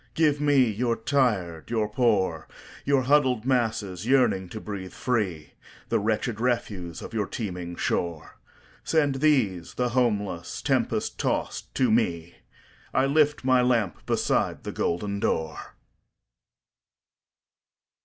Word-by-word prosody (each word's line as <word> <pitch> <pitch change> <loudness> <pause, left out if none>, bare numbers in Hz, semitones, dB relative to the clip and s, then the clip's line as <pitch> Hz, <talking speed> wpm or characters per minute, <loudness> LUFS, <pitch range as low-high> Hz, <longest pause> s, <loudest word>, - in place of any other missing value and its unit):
"Give 150 -3 +2
me 145 -1 +3
your 115 +2 0
tired, 110 - 0
your 110 -2 0
poor, 105 -8 +1 0.4
Your 140 -2 +3
huddled 130 -4 +3
masses 110 -7 -1
yearning 120 -9 +3
to 110 - -6
breathe 100 -4 -7
free, 95 - -2 0.4
The - - +2
wretched 110 +1 -1
refuse 105 -8 -2
of - - -9
your 105 -3 -1
teeming 90 -6 -5
shore. 85 -2 -3 0.4
Send 145 -4 +1
these, 110 - +1
the 125 -1 0
homeless, 105 -8 -1
tempest - - 0
tost - - -2
to 130 -4 +2
me,I 85 +5 -2
lift 145 0 +2
my 130 -1 +4
lamp 115 -7 +1
beside - - 0
the - - -4
golden 100 +4 -2
door!" 80 -5 -2
110 Hz, 115 wpm, -26 LUFS, 95-130 Hz, 0.4 s, my